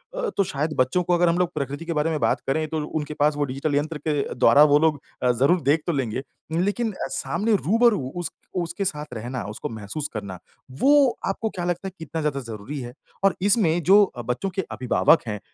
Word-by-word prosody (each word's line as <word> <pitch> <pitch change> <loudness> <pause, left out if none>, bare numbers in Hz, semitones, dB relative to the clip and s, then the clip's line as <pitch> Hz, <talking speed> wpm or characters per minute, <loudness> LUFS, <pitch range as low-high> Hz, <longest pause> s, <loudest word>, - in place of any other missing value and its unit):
अ, - - -1
तो 200 - +4
शायद 155 -3 -2
बच्चों 130 +8 +2
को 180 - +1
अगर 175 0 +4
हम 170 - +1
लोग 180 -1 +1
प्रकृति 145 +2 -4
के 170 - -2
बारे 150 +1 +1
में 155 - -1
बात - - +1
करें, 155 +3 0
तो 160 +1 -3
उनके 150 -1 -4
पास 150 +1 +3
वो 145 - +1
डिजिटल 140 +3 -2
यंत्र 150 +2 -1
के 155 - +2 0.2
द्वारा 125 +4 +6
वो 145 - +7
लोग 155 -3 +2 0.2
अ, 125 - +4
ज़रूर 140 +9 +2
देख 150 +3 +2
तो 170 - +1
लेंगे 130 -2 -2 0.3
लेकिन 205 +7 0
अ, 190 - -5
सामने 210 +5 0
रूबरू 225 +3 +3 0.2
उस 175 -1 -4 0.3
उसके 170 +3 -3
साथ 150 -5 -4
रहना, 120 +1 -5
उसको 105 - -5
महसूस 110 +7 -5
करना, 100 -4 -6 0.3
वो 275 - +4
आपको 220 +3 -1
क्या 175 -3 -5
लगता 175 +2 -2
है - - -6
कितना 160 0 -4
ज़्यादा 150 -2 -1
ज़रूरी 115 +3 -7
है? 120 -1 -7 0.3
और 195 - +4
इसमें 190 -4 +3
जो 200 +5 +7
अ, 125 -11 -4
बच्चों 125 - -2
के 195 - +1
अभिभावक 130 +5 +3
हैं 105 -1 -3
155 Hz, 220 wpm, -24 LUFS, 135-180 Hz, 0.3 s, वो